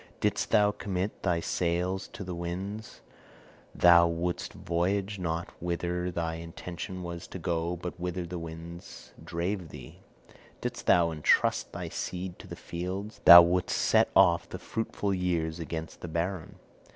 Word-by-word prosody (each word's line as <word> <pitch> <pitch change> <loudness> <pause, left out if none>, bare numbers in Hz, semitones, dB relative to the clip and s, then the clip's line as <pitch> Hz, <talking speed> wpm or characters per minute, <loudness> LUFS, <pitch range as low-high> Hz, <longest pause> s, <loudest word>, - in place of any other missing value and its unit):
Didst - - 0
thou 105 0 +4
commit 100 -1 -3
thy 85 -3 +1
sails 90 +3 -1
to 100 - -6
the 90 -1 -5
winds, 95 +5 -5 0.7
thou 85 -1 +7
wouldst 85 +1 -2
voyage 95 +4 -1
not 85 -1 -3
whither 90 +1 -2
thy 85 -2 -2
intention 85 +2 -7
was 85 0 -6
to - - -7
go, 85 0 -1
but 90 0 -7
whither 90 0 -3
the 85 +1 -5
winds 85 +1 -9
drave 85 +1 -3
thee; 65 -5 -11 0.6
didst - - -5
thou 85 -1 +5
entrust 75 -1 +2
thy - - -5
seed 90 0 -5
to - - -11
the - - -7
fields, 95 +5 -5
thou 85 0 +12
wouldst 90 +1 +1
set - - +3
off - - +5
the - - -5
fruitful 105 -3 -3
years 85 -3 -1
against 80 0 -6
the - - -5
barren. 85 +1 -3
85 Hz, 150 wpm, -29 LUFS, 85-95 Hz, 0.7 s, thou